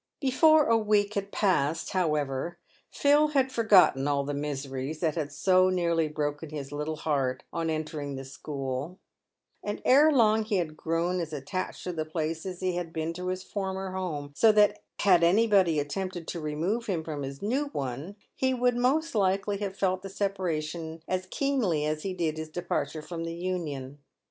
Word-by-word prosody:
Before 305 +3 +5
a 230 0 +4
week 210 -1 +2
had 200 -1 -3
passed, 165 -5 +1
however, 150 -3 -1 0.3
Phil 290 +1 +4
had 265 -1 +3
forgotten 195 - +5
all 140 -1 +1
the 145 +1 -3
miseries 140 0 -4
that 160 -3 +1
had 150 -3 -3
so 185 -1 +4
nearly 170 -3 +1
broken 150 0 -3
his 145 -2 -6
little 150 +2 -3
heart 140 -5 -1
on 165 -1 -1
entering 155 -3 -3
the 135 0 -6
school; 135 +3 -5 0.6
and 205 0 -4
ere 290 +4 +6
long 220 -5 +4
he 215 -1 -1
had 165 -4 -1
grown 165 +3 -1
as 165 -2 -4
attached 150 +6 -4
to 180 - -3
the 160 -2 -2
place 160 +2 -3
as 180 -1 -6
he 185 -1 0
had 175 -2 -4
been 160 0 -3
to 180 +1 -5
his 185 0 -2
former 190 -1 -4
home, 155 -7 -4
so 225 +6 +6
that 210 -1 +4 0.2
had 180 -4 +5
anybody 190 -3 +4
attempted 175 +3 -4
to 170 - -3
remove 165 +10 -2
him 175 -6 -1
from 155 -2 -5
his 135 +3 -6
new 260 +8 +1
one, 140 - -5 0.2
he 260 0 +1
would 245 0 +2
most 280 +7 +1
likely 200 0 +1
have 195 -2 -4
felt 185 -1 +1
the 195 - -7
separation 165 -5 -3
as 185 0 -2
keenly 225 - 0
as 155 0 -1
he 190 +1 -3
did 160 -3 -1
his 160 0 -5
departure 165 -2 -3
from 165 0 -5
the 165 0 -4
Union. 150 -7 -4
175 Hz, 180 wpm, -28 LUFS, 150-200 Hz, 0.6 s, ere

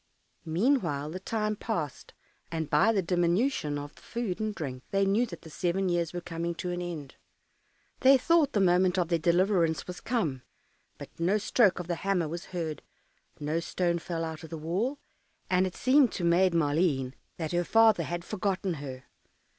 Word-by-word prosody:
Meanwhile 165 - +1
the 185 - -5
time 215 +1 -1
passed, 170 - -4 0.4
and 160 -2 -3
by 150 +10 +5
the 200 -4 +1
diminution 175 - +1
of 145 +1 -7
the - - -19
food 230 -6 -3
and 215 -1 -2
drink 130 -5 -5
they 195 0 +2
knew 210 +5 +2
that 170 -5 -10
the 160 - -10
seven 180 +4 0
years 170 -2 0
were 175 - -5
coming 170 0 -4
to 180 +1 -4
an 175 0 -3
end. 160 -6 -6 0.8
They 270 +1 +7
thought 315 +1 +3
the 210 - +2
moment 180 0 +3
of 175 -2 +1
their 170 -1 +2
deliverance 170 -1 +2
was 180 -1 -8
come; 165 - -1 0.6
but - - -10
no 180 +5 +2
stroke 210 -1 +3
of 180 - -4
the 175 0 -2
hammer 190 -4 +1
was 170 +4 -6
heard, 165 -4 -4 0.6
no 150 +3 -1
stone 170 0 -1
fell 165 -1 -4
out 160 0 -6
of 160 - -9
the 165 - -5
wall, 190 - -1 0.5
and 185 +1 +3
it 185 - -8
seemed 260 -1 +4
to 180 - -4
Maid 175 +2 +4
Maleen 145 -4 +1 0.2
that 160 -2 -3
her 175 0 +1
father 225 -1 +5
had 175 +2 -4
forgotten 195 -2 -1
her. 130 -2 -7
175 Hz, 185 wpm, -29 LUFS, 160-195 Hz, 0.8 s, They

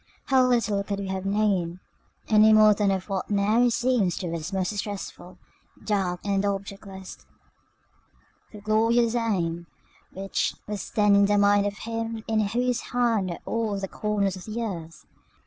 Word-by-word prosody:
How 265 -1 +5
little 225 -5 +1
could 200 0 -3
we 195 -1 -5
have 190 0 -3
known, 195 -4 0 0.5
any 215 0 +6
more 215 -1 +7
than 205 -1 +1
of 190 -1 -1
what 195 -2 -3
now 215 +4 +3
seems 240 - +1
to 175 -3 -4
us 165 +2 -4
most 190 -1 -1
distressful, 205 -1 -6 0.5
dark, 190 -4 -1
and 200 -1 +1
objectless, 195 -1 -5 1.3
the 210 - -11
glorious 225 +2 +2
aim 175 -8 -1 0.4
which 195 +1 -2
was 210 -1 -5
then 210 -1 +3
in 200 0 +5
the 205 0 +2
mind 205 0 +4
of 200 0 -5
Him 225 0 -4
in 220 -1 +1
whose 235 +3 0
hand 230 -6 0
are 170 - -5
all 225 -3 -1
the 195 0 -4
corners 200 -2 -1
of 185 - -10
the 220 +2 -5
earth! 165 -7 -7
205 Hz, 160 wpm, -25 LUFS, 195-220 Hz, 1.3 s, more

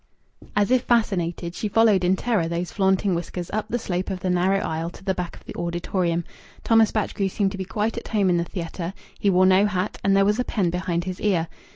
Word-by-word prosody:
As 205 +3 +2
if 255 -1 +4
fascinated, 180 -8 0
she 210 - -3
followed 210 -3 +4
in 180 +2 +3
terror 210 -5 0
those 170 +1 -3
flaunting 190 -1 +2
whiskers 175 0 -4
up 215 0 -1
the 240 - 0
slope 185 -5 -3
of 190 -2 -3
the 185 - 0
narrow 180 +2 +2
isle 165 -2 -2
to 175 - -14
the 190 -1 0
back 180 -2 -4
of - - -17
the - - -8
auditorium. 175 0 -1 0.4
Thomas 225 -2 +4
Batchgrew 205 -2 -1
seemed 195 0 0
to 195 - -6
be 190 - -3
quite 215 +4 -2
at - - -12
home 205 -3 +1
in 175 - +3
the 170 - +1
theatre; 170 +1 -5 0.2
he 200 - +2
wore 185 0 +4
no 190 +2 +5
hat 195 0 -2
and 195 0 +3
there 195 - +4
was 210 +3 +2
a - - +2
pen 190 -8 0
behind 175 -1 -1
his 185 0 -5
ear. 180 -6 +1
190 Hz, 235 wpm, -24 LUFS, 175-210 Hz, 0.4 s, no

